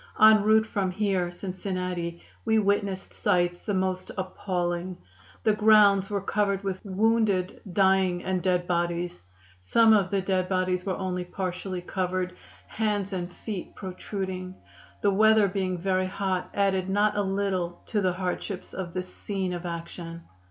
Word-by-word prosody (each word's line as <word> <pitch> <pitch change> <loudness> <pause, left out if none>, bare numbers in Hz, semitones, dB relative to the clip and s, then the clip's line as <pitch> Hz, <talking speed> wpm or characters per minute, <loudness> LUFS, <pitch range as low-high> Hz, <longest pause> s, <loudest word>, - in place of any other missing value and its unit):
En 215 0 +8
route 220 +1 +4
from 200 -4 -1
here 185 -2 0
(Cincinnati) 180 -2 -4 0.2
we 220 -1 +2
witnessed 200 -2 0
sights 175 0 +1
the 205 - -2
most 185 0 -1
appalling; 180 -1 -2 0.5
the 215 - +4
grounds 210 -2 +5
were 205 -1 0
covered 200 0 0
with 190 -1 -3
wounded, 205 -2 +1
dying 190 -1 +3
and 185 -1 -1
dead 180 -1 +1
bodies. 175 - -1 0.4
Some 220 - +5
of 200 -3 +3
the 200 - +1
dead 185 -1 0
bodies 185 0 0
were 190 - -1
only 180 -1 -2
partially 185 0 -4
covered, 185 0 -2 0.3
hands 205 -3 -1
and 180 -1 -3
feet 200 -1 -6
protruding. 185 -1 -5 0.5
The 200 - +3
weather 215 +1 +5
being 185 -1 -1
very 185 +1 0
hot 190 -1 -2
added 190 -2 +1
not 205 +2 +2
a 205 - +2
little 190 -3 -1
to 210 - +1
the 185 -2 +1
hardships 185 +1 -4
of 180 -2 -5
this 185 0 -4
scene 190 -3 -3
of 175 0 -4
action. 170 0 -6
190 Hz, 150 wpm, -27 LUFS, 180-200 Hz, 0.5 s, En